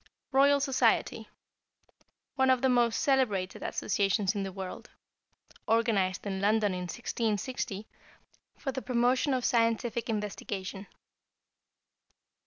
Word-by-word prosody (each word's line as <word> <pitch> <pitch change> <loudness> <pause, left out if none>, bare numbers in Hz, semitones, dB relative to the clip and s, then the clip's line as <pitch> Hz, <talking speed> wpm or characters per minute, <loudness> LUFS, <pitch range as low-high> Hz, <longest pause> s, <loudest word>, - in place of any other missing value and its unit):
=Royal 280 +1 +5
Society.= 270 -2 +1 1.0
One 265 -2 +2
of 260 0 +3
the 265 - +4
most 240 -2 +2
celebrated 215 -10 +1
associations 200 0 0
in 205 - -2
the 195 -1 -4
world. 190 -1 -7 0.8
Organized 215 -5 +1
in 190 -1 -3
London 210 -1 +2
in 180 0 -4
1660 220 -1 -3 0.7
for 270 - -3
the 260 - -4
promotion 250 +3 +1
of 255 -2 0
scientific 230 0 +1
investigation. 200 -2 -4
225 Hz, 105 wpm, -29 LUFS, 195-255 Hz, 1.0 s, =Royal